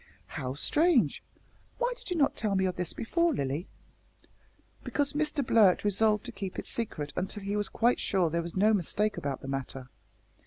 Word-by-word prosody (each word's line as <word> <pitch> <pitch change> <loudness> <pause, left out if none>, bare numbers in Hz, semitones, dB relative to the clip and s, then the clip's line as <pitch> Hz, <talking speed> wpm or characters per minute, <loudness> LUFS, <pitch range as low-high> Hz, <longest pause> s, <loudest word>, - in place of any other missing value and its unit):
'" - - -33 0.2
"How 130 0 -3
strange! 295 - +2 0.6
Why - - 0
did 480 - -11
you 360 - -1
not 280 -3 +2
tell 210 -3 -1
me 190 0 +2
of 185 - -1
this 180 -1 -2
before, 335 +6 0
Lilly?" 140 - -2 1.2
"Because 285 -1 0
Mr 300 -2 0
Blurt 210 -6 +4
resolved 210 +1 +2
to - - -5
keep 195 -2 -6
it - - -4
secret 155 -11 -2
until 195 +3 -4
he 200 +1 -2
was 205 -1 -1
quite 240 +2 +2
sure 180 -5 +1
there 170 +1 0
was 170 +2 -7
no 215 +3 +4
mistake 210 +3 0
about 140 -2 -4
the - - -8
matter. 135 -1 -5
205 Hz, 190 wpm, -29 LUFS, 170-240 Hz, 1.2 s, Blurt